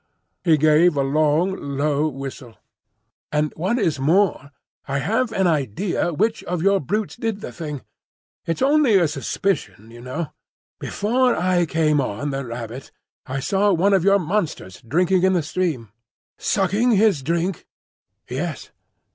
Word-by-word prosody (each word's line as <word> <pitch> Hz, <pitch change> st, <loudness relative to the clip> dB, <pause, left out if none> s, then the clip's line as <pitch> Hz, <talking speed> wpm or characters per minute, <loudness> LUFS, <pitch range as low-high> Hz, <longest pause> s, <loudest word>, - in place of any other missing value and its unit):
He 160 Hz, -3 st, +4 dB
gave 155 Hz, +2 st, +4 dB
a 140 Hz, -, +2 dB
long, 155 Hz, +6 st, +2 dB, 0.2 s
low 150 Hz, +1 st, +1 dB
whistle. 135 Hz, -4 st, -7 dB, 0.7 s
"And 150 Hz, 0 st, 0 dB
what 190 Hz, +9 st, 0 dB
is 165 Hz, -, 0 dB
more, 160 Hz, -1 st, +2 dB, 0.4 s
I 140 Hz, 0 st, -1 dB
have 225 Hz, -, 0 dB
an 195 Hz, -3 st, +1 dB
idea 160 Hz, -, 0 dB
which 220 Hz, +8 st, 0 dB
of 175 Hz, -2 st, -2 dB
your 195 Hz, 0 st, +4 dB
brutes 210 Hz, +8 st, -2 dB
did 225 Hz, -3 st, -3 dB
the -, -, -6 dB
thing. 150 Hz, -5 st, -6 dB, 0.6 s
It's 165 Hz, +7 st, -1 dB
only 280 Hz, -6 st, +4 dB
a 175 Hz, -3 st, +3 dB
suspicion, 130 Hz, -, -3 dB
you 120 Hz, 0 st, -12 dB
know. 135 Hz, +5 st, -5 dB, 0.5 s
Before 245 Hz, +4 st, +1 dB
I 180 Hz, -1 st, +1 dB
came 155 Hz, -2 st, +2 dB
on 130 Hz, +4 st, -3 dB
the 135 Hz, 0 st, -3 dB
rabbit 120 Hz, +1 st, -7 dB, 0.4 s
I 135 Hz, +1 st, -3 dB
saw 200 Hz, +7 st, +2 dB
one 190 Hz, +4 st, +3 dB
of 190 Hz, -3 st, +3 dB
your 200 Hz, +1 st, +5 dB
monsters 170 Hz, -, -3 dB
drinking 180 Hz, +9 st, +1 dB
in 190 Hz, +1 st, +3 dB
the 175 Hz, -3 st, +1 dB
stream." 150 Hz, -, -2 dB, 0.5 s
"Sucking 205 Hz, +5 st, +1 dB
his 200 Hz, -7 st, +3 dB
drink?" 170 Hz, +5 st, -2 dB, 0.6 s
"Yes." -, -, -5 dB
165 Hz, 145 wpm, -22 LUFS, 140-195 Hz, 0.7 s, your